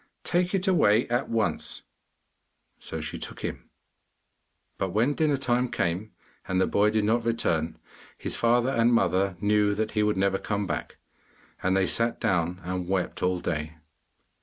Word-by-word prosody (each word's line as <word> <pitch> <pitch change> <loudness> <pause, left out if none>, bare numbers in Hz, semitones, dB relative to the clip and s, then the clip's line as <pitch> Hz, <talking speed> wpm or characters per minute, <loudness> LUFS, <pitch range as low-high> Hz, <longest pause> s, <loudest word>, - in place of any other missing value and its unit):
'Take 180 +2 +1
it 190 +1 0
away 120 - +4
at 120 +3 0
once!' 115 -1 -1 1.0
So - - -5
she - - -5
took - - -7
him. - - -5 1.1
But 95 - 0
when 120 +7 +2
dinner 150 -2 +1
time 125 -1 +1
came, 90 +4 -2 0.4
and 95 0 0
the - - +4
boy 105 +1 +3
did 110 0 +1
not 115 +3 +2
return, 85 -9 0 0.4
his - - -4
father 120 +2 +2
and 115 -2 +3
mother 95 -5 +2
knew 105 0 +2
that 110 +1 -1
he 105 - +1
would 105 -1 +1
never 95 0 +1
come 105 -1 -2
back, 80 -5 -4 0.6
and 95 +1 +2
they 95 - +3
sat 115 +4 +1
down 90 0 0
and 90 0 -3
wept 95 -2 -1
all 90 0 +1
day. 80 -2 -3
105 Hz, 160 wpm, -27 LUFS, 95-120 Hz, 1.1 s, away